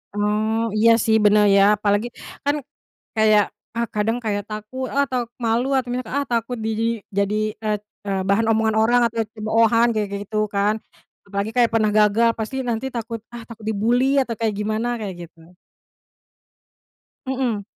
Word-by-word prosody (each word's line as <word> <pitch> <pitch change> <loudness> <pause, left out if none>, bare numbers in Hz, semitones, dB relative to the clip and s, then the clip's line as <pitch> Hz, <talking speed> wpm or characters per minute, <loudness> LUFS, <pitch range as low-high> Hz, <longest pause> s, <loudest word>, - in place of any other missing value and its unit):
Mmm, 215 +2 0
iya 230 +2 +5
sih 220 - +3
bener 210 0 +5
ya 195 - +6
apalagi 205 +2 0 0.4
kan 285 +1 +2 0.6
kayak 215 -1 +5 0.3
ah 235 - +1
kadang 220 +3 +1
kayak 205 -1 -1
takut, 215 +5 -5
ah 280 +1 +3
atau 255 -2 -1 0.2
malu 230 +3 +1
atau 255 -2 -2
misal 250 -1 -3 0.3
takut 235 +1 -1
di - - 0 0.5
jadi 200 +1 +1 0.3
eee, 210 -1 +1 0.3
eee, 195 -1 0
bahan 220 +3 +2
omongan 220 0 +1
orang 240 +2 +4
atau 230 0 -6 0.2
cemoohan 225 +2 +3
kayak 210 -2 -1
gitu 215 +1 -5 0.2
kan 205 +2 +2 0.5
apalagi 200 +2 -2
kayak 240 -2 +4
pernah 215 -2 +2
gagal 215 +2 +4
pasti 220 +4 -4
nanti 230 +2 -2
takut 230 0 -4 0.2
ah 235 - -7
takut 230 -2 -11
dibully 230 +4 +2 0.2
atau 240 - -4
kayak 220 -2 0
gimana 215 +3 -1
kayak 200 -4 -5
gitu. 165 +1 -20 1.7
Mhm. 255 -5 -1
220 Hz, 155 wpm, -22 LUFS, 210-235 Hz, 1.7 s, ya